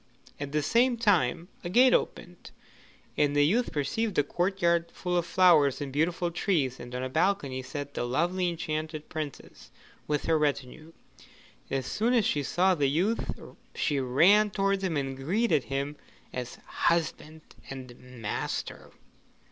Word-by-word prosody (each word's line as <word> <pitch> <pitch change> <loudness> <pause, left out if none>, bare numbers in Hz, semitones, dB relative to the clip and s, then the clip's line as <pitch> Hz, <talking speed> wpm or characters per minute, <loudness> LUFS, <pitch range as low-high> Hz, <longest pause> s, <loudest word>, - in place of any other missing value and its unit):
At 145 -1 -5
the 150 0 0
same 240 - +3
moment 170 -4 +2 0.2
a 175 - -4
gate 245 +6 +5
opened, - - -2 0.7
and 145 -1 +2
the 145 0 +5
youth 230 +10 +1
perceived 195 +9 -2
a 145 - +5
courtyard 170 0 0
full 180 -1 -3
of 170 -1 0
flowers 160 -8 +4
and 140 -2 -5
beautiful 170 +3 0
trees, 160 -8 0
and 120 +1 -8
on 125 - -3
a - - -1
balcony 135 -3 0
sat 145 +2 -6
the - - -2
lovely 175 +9 0
enchanted 155 -2 -4
Princess 155 -3 -7 0.4
with 150 -1 -1
her 160 -1 +2
retinue. 150 +2 -2 0.8
As 135 -2 -2
soon 230 - 0
as 225 -4 +3
she 145 - +1
saw 185 +7 +2
the 145 -5 +1
youth, 190 +11 0 0.5
she 145 -3 0
ran 175 +12 +4
towards 195 0 0
him 170 -5 0
and 135 -1 -2
greeted 165 - +1
him 140 +2 -3 0.4
as 125 -1 -5
her - - -22
husband 160 -1 -1 0.3
and 130 -2 -8
master. 125 -4 -5
155 Hz, 155 wpm, -28 LUFS, 140-185 Hz, 0.8 s, gate